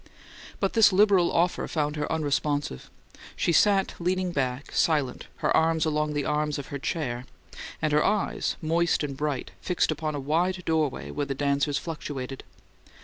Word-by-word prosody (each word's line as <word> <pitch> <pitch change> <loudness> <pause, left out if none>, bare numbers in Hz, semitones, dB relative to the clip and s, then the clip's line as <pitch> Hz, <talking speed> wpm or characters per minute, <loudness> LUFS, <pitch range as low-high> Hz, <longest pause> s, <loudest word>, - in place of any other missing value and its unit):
But 195 - 0
this 225 -2 +6
liberal 195 -2 +4
offer 175 +1 +1
found 150 -2 -1
her 150 -1 -3
unresponsive; 145 - -1 0.5
she - - +1
sat 195 +2 +3
leaning 180 +1 0
back, 135 -3 -2
silent, 145 -6 +1 0.2
her - - +3
arms 160 0 +3
along 150 -1 0
the 145 -1 -1
arms 150 0 0
of 140 - -7
her 140 - -4
chair, 130 -5 -3 0.6
and 155 -1 +1
her 150 - +4
eyes, 210 -1 0
moist 165 0 +1
and 140 -2 -3
bright, 145 -2 -3
fixed 180 -3 +1
upon 155 0 -2
a - - -2
wide 175 +6 0
doorway 155 -4 0
where 145 -1 -2
the 135 - -2
dancers 140 +1 +1
fluctuated. 135 -5 -5
150 Hz, 160 wpm, -27 LUFS, 145-170 Hz, 0.6 s, this